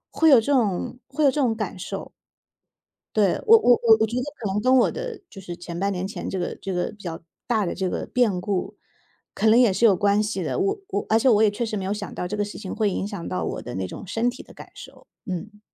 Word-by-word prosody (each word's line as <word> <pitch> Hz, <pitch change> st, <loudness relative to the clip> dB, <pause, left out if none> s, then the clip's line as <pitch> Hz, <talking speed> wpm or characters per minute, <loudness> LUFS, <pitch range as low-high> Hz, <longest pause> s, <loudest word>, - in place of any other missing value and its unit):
会 320 Hz, -1 st, +5 dB
有 265 Hz, -, +8 dB
这 285 Hz, -, 0 dB
种 235 Hz, 0 st, 0 dB
会 280 Hz, +3 st, -2 dB
有 275 Hz, -, +6 dB
这 295 Hz, -, -1 dB
种 230 Hz, -4 st, +2 dB
感 210 Hz, -4 st, -4 dB
受。 -, -, -6 dB, 1.0 s
对， 200 Hz, -4 st, +4 dB
我 455 Hz, +1 st, +8 dB
我 325 Hz, -, +5 dB
我 225 Hz, -1 st, +7 dB
我 220 Hz, -, +4 dB
觉 235 Hz, +3 st, -5 dB
得 -, -, -1 dB
可 215 Hz, -, -4 dB
能 210 Hz, -, 0 dB
跟 255 Hz, +1 st, +4 dB
我 250 Hz, -, +4 dB
的 -, -, -6 dB
就 195 Hz, -, -11 dB
是 175 Hz, -2 st, -7 dB
前 170 Hz, -1 st, -7 dB
半 200 Hz, +2 st, 0 dB
年 185 Hz, 0 st, -3 dB
前 200 Hz, -, -6 dB
这 190 Hz, -, -3 dB
个 175 Hz, -, -3 dB
这 195 Hz, -, -3 dB
个 180 Hz, -1 st, -1 dB
比 210 Hz, -, -16 dB
较 165 Hz, -2 st, -5 dB, 0.3 s
大 220 Hz, -6 st, +1 dB
的 -, -, -2 dB
这 190 Hz, -2 st, -2 dB
个 -, -, -3 dB
变 220 Hz, -8 st, +1 dB
故， 190 Hz, 0 st, -3 dB, 0.6 s
可 220 Hz, -, +2 dB
能 225 Hz, -, +6 dB
也 240 Hz, -5 st, +5 dB
是 190 Hz, +5 st, 0 dB
有 205 Hz, -5 st, +6 dB
关 205 Hz, +2 st, +2 dB
系 205 Hz, -3 st, -3 dB
的， -, -, -2 dB
我 395 Hz, +1 st, 0 dB
我 200 Hz, -, -2 dB
而 220 Hz, -, +4 dB
且 260 Hz, -, +3 dB
我 220 Hz, -3 st, +5 dB
也 215 Hz, -, +5 dB
确 225 Hz, +3 st, -3 dB
实 215 Hz, -, -3 dB
没 195 Hz, -, -3 dB
有 195 Hz, -, -1 dB
想 205 Hz, -1 st, -5 dB
到 180 Hz, -, -4 dB
这 210 Hz, -, -3 dB
个 205 Hz, -, 0 dB
事 205 Hz, -, -8 dB
情 195 Hz, -3 st, -7 dB
会 215 Hz, -1 st, +1 dB
影 195 Hz, 0 st, -2 dB
响 200 Hz, -5 st, -6 dB
到 90 Hz, -, -2 dB
我 -, -, -4 dB
的 -, -, -7 dB
那 95 Hz, 0 st, -2 dB
种 185 Hz, -, -9 dB
身 230 Hz, +5 st, 0 dB
体 255 Hz, -, -10 dB
的 -, -, -16 dB
感 -, -, -12 dB
受， -, -, -13 dB, 0.2 s
嗯。 210 Hz, +3 st, -6 dB
210 Hz, 295 characters per minute, -24 LUFS, 190-240 Hz, 1.0 s, 有